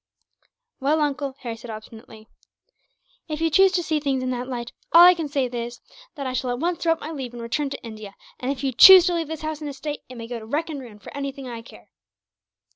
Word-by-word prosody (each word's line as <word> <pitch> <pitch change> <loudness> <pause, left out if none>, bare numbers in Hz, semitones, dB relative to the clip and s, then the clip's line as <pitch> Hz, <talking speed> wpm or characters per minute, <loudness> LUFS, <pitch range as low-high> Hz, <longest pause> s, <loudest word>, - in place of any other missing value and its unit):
"Well, 295 +3 +1
uncle," 280 -2 -1
Harry 235 -3 -5
said 230 +1 -12
obstinately, 220 0 -11 1.0
"if 305 -2 -4
you 325 0 +1
choose 385 +4 +5
to 350 -1 +1
see 310 -1 0
things 275 -3 -1
in 255 - -1
that 250 0 -4
light, 240 -2 -5 0.2
all 340 +1 +9
I 360 - +9
can 330 -3 -4
say 280 -2 0
is, 240 -1 -5 0.4
that 280 -3 -5
I 255 - -3
shall 255 0 -2
at 245 - -1
once 340 +5 -1
throw 330 -1 +2
up - - -11
my 310 - -6
leave 265 -6 -6
and 240 - -8
return 280 +5 -2
to 275 - -7
India; 215 -3 -9 0.2
and 255 +2 -2
if 280 -1 -5
you 270 - +1
choose 370 +8 +10
to 360 - +1
leave 335 -2 -1
this 315 0 -6
house 310 0 -4
and 295 - -4
estate, 290 +2 -6
it 255 - -10
may 230 -1 -7
go 240 0 -5
to 220 - -11
wreck 310 +6 -2
and 285 -3 -6
ruin 230 -5 -12
for 205 - -12
anything 275 -1 -5
I 235 -2 -7
care." 225 -2 -16
270 Hz, 250 wpm, -23 LUFS, 240-310 Hz, 1.0 s, choose